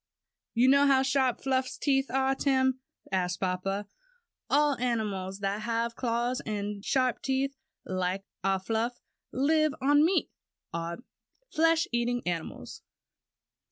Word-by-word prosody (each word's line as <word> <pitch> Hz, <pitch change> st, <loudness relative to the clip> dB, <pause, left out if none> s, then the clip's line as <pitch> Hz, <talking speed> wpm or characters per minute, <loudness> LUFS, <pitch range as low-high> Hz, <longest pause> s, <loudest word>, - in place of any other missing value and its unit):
"You 240 Hz, +2 st, +4 dB
know 280 Hz, +1 st, +6 dB
how 265 Hz, -1 st, +5 dB
sharp 265 Hz, -2 st, +1 dB
Fluff's 260 Hz, -1 st, 0 dB
teeth 270 Hz, -2 st, +1 dB
are, 265 Hz, +1 st, +2 dB
Tim?" 260 Hz, -1 st, +1 dB, 0.3 s
asked 180 Hz, -2 st, 0 dB
papa. 195 Hz, +2 st, -1 dB, 0.6 s
"All 295 Hz, -1 st, +3 dB
animals 205 Hz, -6 st, -2 dB
that 200 Hz, +1 st, -1 dB
have 230 Hz, +1 st, -1 dB
claws 240 Hz, +1 st, -1 dB
and 205 Hz, -1 st, -4 dB
sharp 255 Hz, -1 st, +1 dB
teeth 270 Hz, +1 st, 0 dB, 0.3 s
like 185 Hz, +1 st, -2 dB, 0.2 s
our 195 Hz, 0 st, +2 dB
Fluff, 225 Hz, +5 st, -2 dB, 0.3 s
live 310 Hz, +2 st, +2 dB
on 290 Hz, +2 st, +4 dB
meat, 355 Hz, +4 st, +2 dB, 0.4 s
or 170 Hz, -, -1 dB
are 170 Hz, +1 st, -4 dB, 0.6 s
flesh 330 Hz, 0 st, +3 dB
eating 240 Hz, 0 st, 0 dB
animals. 170 Hz, -2 st, -4 dB
245 Hz, 125 wpm, -29 LUFS, 200-270 Hz, 0.6 s, know